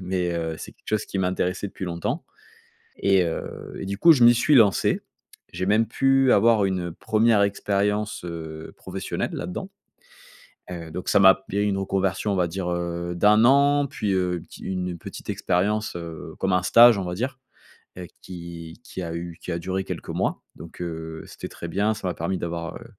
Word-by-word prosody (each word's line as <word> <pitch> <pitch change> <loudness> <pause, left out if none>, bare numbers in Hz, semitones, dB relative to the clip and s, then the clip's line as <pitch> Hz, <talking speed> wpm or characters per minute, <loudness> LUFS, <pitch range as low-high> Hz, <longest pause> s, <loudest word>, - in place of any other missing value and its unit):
Mais, 90 -1 -1
heu, 80 -1 -3
c'est - - -8
quelque - - -22
chose 110 -1 0
qui 95 - -4
m'intéressait 90 +1 -1
depuis 95 - -7
longtemps 85 -1 -3 0.8
et 95 -2 +4
heu, 85 - -5
et - - -5
du 100 +1 -3
coup, 170 - +8
je 130 -6 +4
m'y 120 0 +8
suis 125 +6 +3
lancé. 110 -7 +4 0.5
J'ai 95 - -3
même 110 +3 +3
pu 135 0 +3
avoir 110 0 +4
une 90 -3 -1
1re 110 +3 +2
expérience, 100 0 0
heu, 80 -2 -7
professionnelle - - -4
là-dans. - - -5 1.0
Heu, 85 -2 -7
donc 90 +3 -4
ça - - +4
m'a 95 0 +8
b - - -12
il - - -5
y - - +2
a - - +2
une 100 -1 0
reconversion, 95 +1 0
on - - 0
va 90 -2 +1
dire, 90 +1 -4
heu, 85 0 -3
d'1 105 +4 +5
an, 140 +2 +5
puis, 105 -6 -2
heu, 90 -1 +1
une 85 - -10
pti - - -13
une 90 -2 -3
petite - - -10
expérience, 105 +4 0
heu, 80 -1 -8
comme 95 -1 +1
un 90 0 +2
stage, 115 +2 +7
on - - -2
va 90 0 -4
dire, 130 +6 -3 0.6
heu, 90 - -6 0.2
qui 85 -1 -9
qui - - -7
a 85 -1 -4
eu 85 0 -6
qui - - -5
a 85 - -1
duré 95 +2 -2
quelques - - -6
mois. - - -1
Donc, 85 - -12
heu, 80 -2 -5
c'était - - -8
très 85 - -8
bien. 100 +5 +1
Ça 95 - -5
m'a 90 - -1
permis 90 +3 -2
d'avoir, 85 -1 -4
heu, 120 - -13
95 Hz, 205 wpm, -24 LUFS, 85-105 Hz, 1.0 s, coup